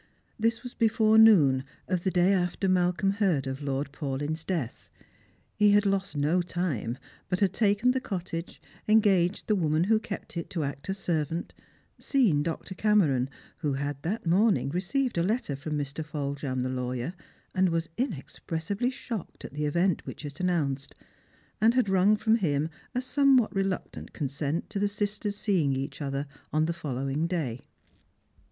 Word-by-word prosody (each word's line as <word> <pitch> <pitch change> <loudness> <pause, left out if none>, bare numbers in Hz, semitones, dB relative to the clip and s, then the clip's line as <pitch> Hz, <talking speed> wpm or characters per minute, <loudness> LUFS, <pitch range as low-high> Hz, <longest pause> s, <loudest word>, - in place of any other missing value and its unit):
This 230 +1 +2
■\ve.g 245 -1 -8
before 220 -1 +4
noon 150 -13 +6 0.2
of 180 -2 -1
the 190 - +2
day 180 +1 +3
after 180 +1 0
Malcolm 180 +1 +2
heard 190 -9 +1
of 135 +1 -4
Lord 140 0 -2
Paulyn's 145 +2 -3
death. 160 -11 -3 0.6
He 210 -1 +4
had 205 0 +4
lost 195 -4 0
no 155 +5 +2
time, 165 - -2 0.3
but 180 - 0
had 195 -2 +2
taken 210 +3 +3
the 260 - 0
cottage, 175 -5 -5 0.3
engaged 205 -4 +3
the 215 - +2
woman 160 -4 +2
who 215 +3 +3
kept 200 -5 -7
it 170 - -4
to 165 -4 -2
act 140 +4 -5
as 190 - -1
servant, 165 -3 -2 0.5
seen 225 - +2
Dr. 165 +4 -4
Cameron, 175 -12 +2 0.3
who 150 -4 -1
had 140 0 -3
that 205 +8 -3
morning 190 -1 +3
received 195 - -1
a - - +3
letter 195 - 0
from 150 +2 -4
Mi. 145 - 0
Foljambe 140 -2 -3
the 130 - -1
lawyer, 125 +4 -3 0.4
and 185 0 +3
was 165 -1 -1
inexpressibly 200 - -2
shocked 235 -6 -6
at - - -9
the 150 +1 -2
event 170 +4 +1
which - - -7
it 145 0 -8
announced, 145 -7 -1 0.7
and 225 +2 +5
had 255 -4 +3
wrung 195 +2 +4
from 220 +1 +3
him 155 -5 0 0.2
a 250 - +1
somewhat 265 -3 +3
reluctant 195 -1 -3
consent 145 +2 -2
to 205 - -2
the 205 - +2
sisters 205 0 -2
seeing 175 -10 +1
each 135 +2 -4
other 140 0 -2 0.3
on 155 +1 +2
the 170 - -1
follow 135 -5 -4
ing 150 +5 0
day. 140 -9 -2
175 Hz, 165 wpm, -28 LUFS, 145-205 Hz, 0.7 s, noon